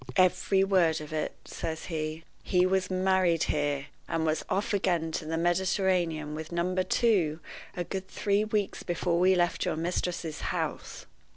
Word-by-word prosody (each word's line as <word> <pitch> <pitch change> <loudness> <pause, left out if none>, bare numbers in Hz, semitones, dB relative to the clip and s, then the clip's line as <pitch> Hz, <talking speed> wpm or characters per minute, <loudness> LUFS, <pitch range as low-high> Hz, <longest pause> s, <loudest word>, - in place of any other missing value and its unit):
"Every 185 +1 +3
word 180 -5 +3
of 155 0 -8
it," 155 -1 -2
says 160 -1 -5
he. 155 -1 -4 0.2
"He 180 -1 +2
was 185 0 +1
married 185 -3 +2
here, 145 -2 0 0.2
and 160 -1 -1
was 155 0 0
off 210 +3 0
again 175 -5 +1
to 160 - -3
the 165 +1 -2
Mediterranean 175 -3 +1
with 160 +1 -6
Number 180 +2 0
Two 185 -7 +2 0.4
a 175 - 0
good 190 +2 -5
three 200 +2 +1
weeks 210 -2 -1
before 175 0 0
we 185 +1 +5
left 175 -1 +1
your - - 0
mistress's 170 -1 -2
house. - - -3
175 Hz, 160 wpm, -29 LUFS, 160-190 Hz, 0.4 s, we